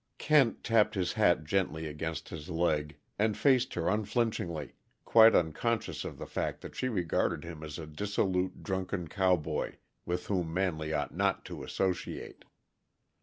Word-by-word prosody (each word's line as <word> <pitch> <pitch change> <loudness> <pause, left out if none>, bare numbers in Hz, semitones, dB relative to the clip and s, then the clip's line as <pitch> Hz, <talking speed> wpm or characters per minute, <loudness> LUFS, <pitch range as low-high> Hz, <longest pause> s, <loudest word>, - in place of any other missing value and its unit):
Kent 145 -6 +3
tapped 110 -1 +3
his 90 -2 0
hat 95 -7 +3
gently 80 -1 -1
against 80 +1 -4
his 80 +1 -8
leg 75 -3 0 0.2
and 110 0 +2
faced 130 -3 +3
her 85 -1 -1
unflinchingly, 105 - -1 0.3
quite 115 0 +7
unconscious 110 +8 0
of - - -6
the - - -6
fact - - -3
that - - -9
she 130 - -1
regarded 90 -8 0
him 85 -2 -8
as 75 -1 -6
a 80 - -6
dissolute, 95 +2 -1
drunken 95 -2 -2
cowboy 90 -4 0 0.3
with 90 +1 -3
whom 90 -5 -1
Manley 80 -4 -1
ought 75 -3 -1
not - - 0
to - - -7
associate. 95 -2 -3
90 Hz, 150 wpm, -31 LUFS, 80-105 Hz, 0.3 s, quite